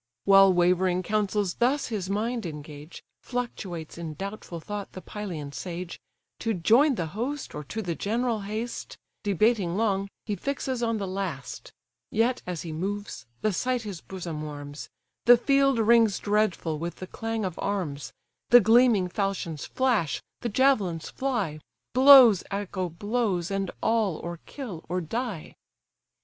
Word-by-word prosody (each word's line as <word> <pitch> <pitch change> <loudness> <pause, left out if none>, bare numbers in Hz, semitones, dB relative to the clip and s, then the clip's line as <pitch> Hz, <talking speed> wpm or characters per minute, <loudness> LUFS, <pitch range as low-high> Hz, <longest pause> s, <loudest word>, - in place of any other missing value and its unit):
While 195 -1 +7
wavering 180 +1 +2
counsels 205 -1 0
thus 260 +4 +1
his 200 -5 -3
mind 225 +4 -1
engage, 150 -1 -8 0.2
Fluctuates 185 -10 -5
in 160 -2 -5
doubtful 195 -1 -6
thought 205 +4 -6
the 185 - -8
Pylian 170 -9 -6
sage, 175 +1 -6 0.4
To 225 -2 -1
join 240 - +4
the 170 - -2
host, 265 +7 -4
or 150 - -5
to 220 +10 -4
the 175 -3 -2
general 230 +5 -1
haste; 215 +4 -5 0.2
Debating 200 -2 +1
long, 200 -3 0 0.2
he 205 - -2
fixes 265 0 -3
on 230 -1 0
the 200 - -3
last: 185 -9 -5 0.4
Yet, 240 +3 +1
as 180 -3 -4
he 165 - -6
moves, 195 - -4
the 215 -1 +1
sight 250 +5 -1
his 200 -6 -6
bosom 170 -5 -6
warms, 145 -1 -7 0.4
The 245 0 +9
field 275 +1 +3
rings 225 -2 +4
dreadful 205 -7 0
with 170 +2 -4
the 185 - -7
clang 225 +2 -3
of 180 -3 -5
arms, 150 -10 -3 0.4
The 245 - +9
gleaming 225 -3 +5
falchions 180 -5 -3
flash, 240 - +1 0.2
the 240 - -3
javelins 205 - +2
fly; 225 - -2 0.3
Blows 255 -6 +8
echo 195 -2 -3
blows, 200 -1 -1
and 195 -1 -1
all 220 -6 +2
or 170 -1 -6
kill 220 - -7
or 180 +1 0
die. 210 0 -4
200 Hz, 145 wpm, -27 LUFS, 175-230 Hz, 0.4 s, The